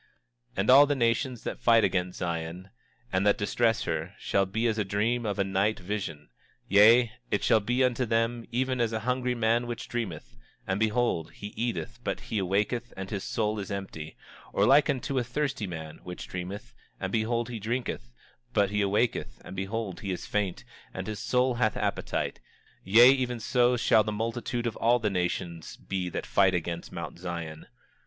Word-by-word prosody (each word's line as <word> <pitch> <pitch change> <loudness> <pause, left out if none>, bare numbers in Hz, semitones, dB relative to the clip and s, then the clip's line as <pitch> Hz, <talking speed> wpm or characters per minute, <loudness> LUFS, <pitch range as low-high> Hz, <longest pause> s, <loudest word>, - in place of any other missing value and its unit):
27:3 - - -24
And 100 +4 +1
all 140 +2 +9
the 145 - +1
nations 120 0 0
that - - -4
fight 115 -2 +5
against 90 -2 0
Zion, 85 +2 -4 0.4
and 95 +1 +2
that 105 - +4
distress 115 +2 +1
her, - - -3
shall 95 -1 +1
be 110 +5 -1
as 110 -2 +1
a - - +2
dream 110 +4 0
of 100 -1 -2
a 100 - +2
night 95 +3 0
vision; 90 - -5 0.4
yea, 110 +4 +6 0.2
it - - 0
shall 110 - +5
be 120 +5 +1
unto 125 -1 +1
them, 115 +1 0
even 130 +1 0
as 115 -1 +1
unto 110 - -2
a - - -9
hungry 125 0 0
man 115 +1 +1
which 120 -1 -5
dreameth, 95 - -5 0.3
and 95 +1 -1
behold 110 -7 0
he 105 0 -8
eateth 120 0 -3
but - - -2
he 110 - -3
awaketh 105 +6 0
and 95 +1 -6
his 100 -3 -3
soul 110 -1 -1
is 100 - -5
empty; 95 -6 -6 0.4
or - - +3
like 145 +3 +5
unto 135 0 0
a - - 0
thirsty 130 -3 -2
man 80 -3 -7
which 90 0 -8
dreameth, 95 +6 -6 0.3
and 95 -1 -3
behold 115 +2 0
he 120 -2 -5
drinketh 110 - -3 0.4
but 100 -1 +2
he 105 0 +1
awaketh 100 - 0
and - - -8
behold 95 +1 -3
he 100 - -5
is 90 - -4
faint, 100 -4 -2 0.3
and 95 - -4
his 105 0 -5
soul 125 0 +2
hath 115 -4 +1
appetite; - - -2 0.4
yea, 115 +7 +8
even 125 -3 0
so 125 +2 +2
shall 110 -1 +4
the 105 - -3
multitude 115 +2 -2
of 115 - -2
all 120 +2 +4
the 110 -4 -1
nations 90 -2 -3
be 95 -2 -3
that - - -4
fight 95 -2 +3
against 85 0 -3
Mount - - -6
Zion. 85 -3 -6
110 Hz, 190 wpm, -28 LUFS, 95-120 Hz, 0.4 s, all